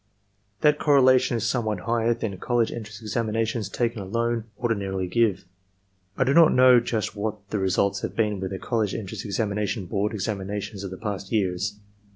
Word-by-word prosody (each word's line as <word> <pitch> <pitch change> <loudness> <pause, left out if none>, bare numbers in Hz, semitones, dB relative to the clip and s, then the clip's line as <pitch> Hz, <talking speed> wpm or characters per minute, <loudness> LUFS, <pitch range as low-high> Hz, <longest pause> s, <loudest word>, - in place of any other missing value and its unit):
That 150 -1 +4
correlation 130 -4 +4
is 115 - -2
somewhat 110 -5 -1
higher 115 +3 +1
than 110 -4 -4
college 120 -2 +1
entrance 110 -1 -8
examinations 110 0 -1
taken 115 -3 -1
alone 115 +3 -1
ordinarily 100 -6 -1
give. 95 -1 +1 0.7
I - - +3
do 135 +2 +2
not 165 0 +7
know 125 -1 +7
just 110 -3 -2
what 105 -1 -4
the 105 - 0
results 95 +1 +1
have - - -4
been 105 -3 0
with 95 0 -3
the 95 - -4
College 110 -1 -1
Entrance 100 -5 -5
Examination 105 0 -2
Board 105 +4 -1
examinations 100 0 -4
of 100 - -4
the 95 - -8
past 100 -3 -5
years. 100 -1 0
110 Hz, 170 wpm, -25 LUFS, 100-115 Hz, 0.7 s, not